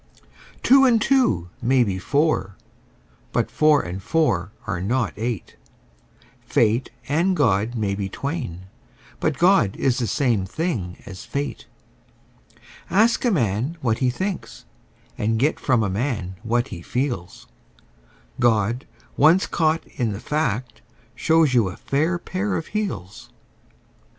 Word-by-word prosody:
Two 270 +1 +6
and 245 -4 +5
two 210 - +2
may 125 +1 +3
be 95 -4 -2
four: 140 - 0 0.8
but - - 0
four 155 -2 +4
and 90 +2 -6
four 95 - +1
are 90 -6 -3
not 115 +3 0
eight: 115 - -4 0.8
Fate 115 +3 +1 0.2
and 170 +6 +2
God 110 -3 +2
may 105 -4 -1
be 100 -1 -3
twain: 135 - -4 0.6
but 155 -3 0
God 175 - +4
is 130 -2 +1
the 120 - -1
same 120 -8 +1
thing 100 - -3
as 95 -5 -9
fate. 140 0 -4 1.2
Ask 220 +6 +3
a - - +4
man 125 - 0
what 115 -3 0
he 130 - +2
thinks, 175 - -4 0.5
and 110 +1 +1
get 140 +7 +1
from 125 -5 +2
a - - 0
man 100 -2 -2
what 120 +2 0
he 85 -4 -7
feels: 120 -4 -3 0.9
God, 115 0 +1 0.3
once 165 +6 +5
caught 160 -1 0
in 115 -5 -3
the 100 - -6
fact, 125 -6 -2 0.3
shows 160 -4 +3
you 115 -5 +4
a 90 - -9
fair 160 +6 0
pair 190 +3 -3
of 160 - -4
heels. 105 - -4
125 Hz, 135 wpm, -23 LUFS, 100-155 Hz, 1.2 s, Two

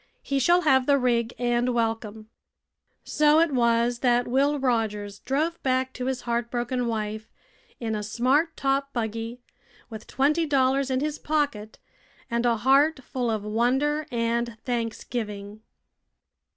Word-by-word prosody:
He 275 -1 -1
shall 345 +7 +4
have 265 -5 +3
the 285 -1 +5
rig 240 -3 +1
and 240 0 0
welcome." 225 -2 -2 0.8
So 300 +1 +3
it 330 -1 +3
was 235 -1 +2
that 245 -1 +2
Will 280 +4 +2
Rogers 215 -6 -1
drove 310 +6 -2
back 260 0 0
to 250 0 -4
his 265 -1 -2
heartbroken 240 +1 -2
wife 215 -1 -4 0.5
in 225 -2 -3
a 210 - -2
smart 260 +10 +1
top 275 0 0
buggy, 230 +1 -4 0.5
with 220 -1 -9
twenty 305 +5 +1
dollars 270 -1 +2
in 260 0 0
his 300 0 -2
pocket 285 -9 -2 0.5
and 235 +1 +1
a 235 -1 +2
heart 275 +5 +3
full 245 -2 -3
of 215 -2 -2
wonder 265 +8 0
and 235 -1 -1
thanksgiving. 220 -3 -4
245 Hz, 140 wpm, -25 LUFS, 230-275 Hz, 0.8 s, the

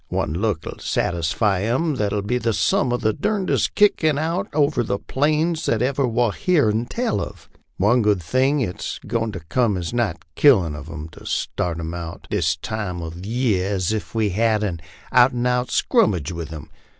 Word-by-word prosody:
One 75 - -1
look 90 -3 -1
'11 - - -7
satisfy 90 +4 0
'em 130 +9 0
thar 105 -4 0
'11 100 0 -2
be 125 +4 0
sum 145 - +2
of 120 - -1
the 110 - +2
durndest 200 +4 0
kickin' 160 -8 +3
out 165 +4 -1
over 145 0 +2
these 110 -4 -1
plains 155 +4 +1
that 115 +1 +1
ever 135 +1 +1
war 120 -1 +1
heern 120 - +1
tell 235 - -1
uv. - - -7 0.3
One 115 +6 +3
good 105 -3 +2
thing, 130 - +1
it's 90 -7 -4
goin' 115 -1 -1
to 95 - -6
cum 105 +5 +1
as 90 +4 -4
nigh 115 -8 0 0.2
killin' 95 - +4
uv 75 +2 -8
'em 80 -2 -6
to - - -14
start 85 -2 -2
'em 80 0 -4
out 85 +1 -7
this 85 -5 +1
time 90 +1 -4
uv 85 +2 -7
year 105 -5 0
as 95 +2 0
ef 110 +1 -5
we 110 -2 +2
hed 110 +2 +1
an 90 -5 -2 0.3
out 125 +1 +5
an' 120 0 -1
out 125 0 +1
scrummage 95 - +2
with 85 -2 -6
'em. 80 -1 -9
110 Hz, 190 wpm, -22 LUFS, 90-130 Hz, 0.3 s, out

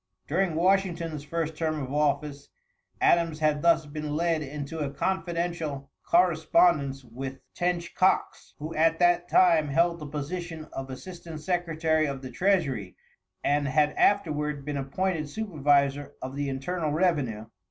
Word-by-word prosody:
During 175 +1 0
Washington's 170 -4 +1
first 160 +1 -3
term 155 -1 -1
of 135 -1 -5
office, 145 -1 -1 0.5
Adams 165 -2 +3
had 150 -1 +1
thus 165 -1 +4
been 150 0 -5
led 165 -1 +1
into 150 +2 -6
a 145 -2 -1
confidential 170 -4 -2 0.2
correspondence 160 -5 +3
with 130 +3 -7 0.2
Tench 175 -1 -1
Coxe, 185 +1 +1
who 155 +2 -6
at 165 +1 +3
that 175 0 +3
time 165 -4 +5
held 170 +4 +2
the 150 - -7
position 160 +2 -5
of 135 0 -5
assistant 165 +3 -8
secretary 160 -2 0
of 135 -1 -5
the 130 - -7
treasury 140 - 0 0.5
and 145 0 +1
had 150 +2 +3
afterward 150 -8 +1
been 145 -1 -3
appointed 155 +3 -2
supervisor 145 -7 +1
of 130 +1 -6
the 145 0 -2
internal 155 +5 -2
revenue. 145 - 0
155 Hz, 140 wpm, -27 LUFS, 140-170 Hz, 0.5 s, time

